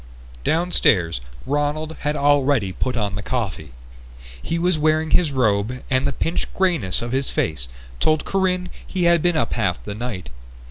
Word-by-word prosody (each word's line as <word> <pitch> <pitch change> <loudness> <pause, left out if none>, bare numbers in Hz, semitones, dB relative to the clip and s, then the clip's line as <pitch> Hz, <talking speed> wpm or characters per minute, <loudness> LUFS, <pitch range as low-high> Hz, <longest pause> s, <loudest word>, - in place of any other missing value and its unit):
Downstairs 100 - +2 0.2
Ronald 145 +2 -1
had 150 +1 -1
already 140 -8 +2
put 125 +6 -2
on 105 -3 -1
the 100 - -3
coffee. 100 - -3 0.7
He 165 - -2
was 175 -1 +1
wearing 155 +1 +2
his 165 -5 +3
robe 120 -1 0
and 130 +1 +2
the - - 0
pinched 165 - -2
greyness 165 - +3
of 120 - -4
his 135 +1 0
face 70 -7 -2 0.3
told 155 -1 +2
Corinne 185 -2 0 0.2
he 185 -2 -2
had 170 -1 +4
been 175 -1 +2
up - - 0
half 90 -7 -1
the 105 - -4
night. 110 -4 -5
140 Hz, 165 wpm, -22 LUFS, 105-160 Hz, 0.7 s, had